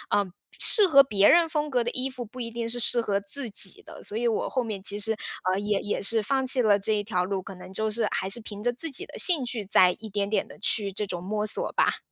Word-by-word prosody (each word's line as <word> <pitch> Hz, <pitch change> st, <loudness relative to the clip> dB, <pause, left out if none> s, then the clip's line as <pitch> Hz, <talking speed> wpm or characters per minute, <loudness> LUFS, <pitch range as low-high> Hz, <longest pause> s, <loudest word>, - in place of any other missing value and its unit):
嗯， 200 Hz, -3 st, -1 dB, 0.3 s
适 415 Hz, -4 st, +5 dB
合 275 Hz, -4 st, +6 dB
别 205 Hz, -6 st, +2 dB
人 340 Hz, 0 st, +4 dB
风 300 Hz, -1 st, -3 dB
格 250 Hz, -3 st, 0 dB
的 240 Hz, -, -3 dB
衣 255 Hz, +2 st, -2 dB
服 250 Hz, -2 st, -8 dB
不 250 Hz, +4 st, -13 dB
一 230 Hz, -, -5 dB
定 230 Hz, 0 st, -5 dB
是 240 Hz, +1 st, -2 dB
适 240 Hz, 0 st, +4 dB
合 200 Hz, -3 st, -2 dB
自 225 Hz, +5 st, -3 dB
己 195 Hz, -3 st, +3 dB
的， -, -, -13 dB
所 210 Hz, -, -3 dB
以 240 Hz, +1 st, -1 dB
我 225 Hz, -, -2 dB
后 255 Hz, -, -2 dB
面 215 Hz, -4 st, -6 dB
其 205 Hz, +1 st, +1 dB
实， 220 Hz, +1 st, +2 dB, 0.4 s
呃， 190 Hz, -, -1 dB
也 205 Hz, -1 st, -2 dB
也 205 Hz, -, -4 dB
是 220 Hz, +2 st, +2 dB
放 265 Hz, +4 st, -2 dB
弃 255 Hz, 0 st, +5 dB
了 205 Hz, -3 st, +3 dB
这 215 Hz, +2 st, -1 dB
一 205 Hz, -1 st, -2 dB
条 185 Hz, -4 st, -2 dB
路， 195 Hz, 0 st, -4 dB
可 190 Hz, +1 st, -11 dB
能 185 Hz, +1 st, -13 dB
就 220 Hz, +2 st, -1 dB
是 215 Hz, 0 st, 0 dB
还 190 Hz, -, -3 dB
是 200 Hz, -, +3 dB
凭 210 Hz, -1 st, -9 dB
着 245 Hz, -, 0 dB
自 325 Hz, +7 st, +1 dB
己 370 Hz, +9 st, -2 dB
的 -, -, -13 dB
兴 325 Hz, -8 st, +4 dB
趣 230 Hz, -4 st, -4 dB
再 185 Hz, -2 st, +4 dB
一 220 Hz, -1 st, -10 dB
点 200 Hz, 0 st, -3 dB
点 215 Hz, -, -2 dB
地 -, -, -15 dB
去 205 Hz, -1 st, +3 dB
这 205 Hz, +2 st, -4 dB
种 175 Hz, -2 st, -6 dB
摸 210 Hz, +2 st, -3 dB
索 -, -, +2 dB
吧。 -, -, 0 dB
220 Hz, 300 characters per minute, -25 LUFS, 200-245 Hz, 0.4 s, 合